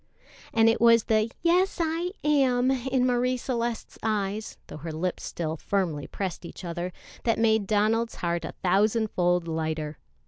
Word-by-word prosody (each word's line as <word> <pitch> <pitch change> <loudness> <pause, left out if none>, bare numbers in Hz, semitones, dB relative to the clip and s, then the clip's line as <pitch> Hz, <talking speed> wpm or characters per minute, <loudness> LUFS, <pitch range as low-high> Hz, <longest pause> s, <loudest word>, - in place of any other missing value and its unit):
And 225 0 +4
it 225 - +3
was 230 -1 +6
the 215 0 +2
"yes, 360 +3 +3
I 335 +2 0
am" 265 -4 +3
in 260 0 +1
Marie 250 0 +1
Celeste's 235 -2 -3
eyes, 210 -1 -2
though - - -9
her 160 +2 -6
lips 175 +3 -3
still 160 -2 -3
firmly 170 -6 -1
pressed 185 -3 -4
each 175 +2 -9
other, 175 +1 -3 0.3
that 230 - +2
made 220 -3 +2
Donald's 220 +3 +1
heart 170 -1 -2
a 160 - -5
thousand 210 +4 +2
fold 175 -1 +1
lighter. 160 -2 -3
215 Hz, 160 wpm, -27 LUFS, 175-245 Hz, 0.3 s, was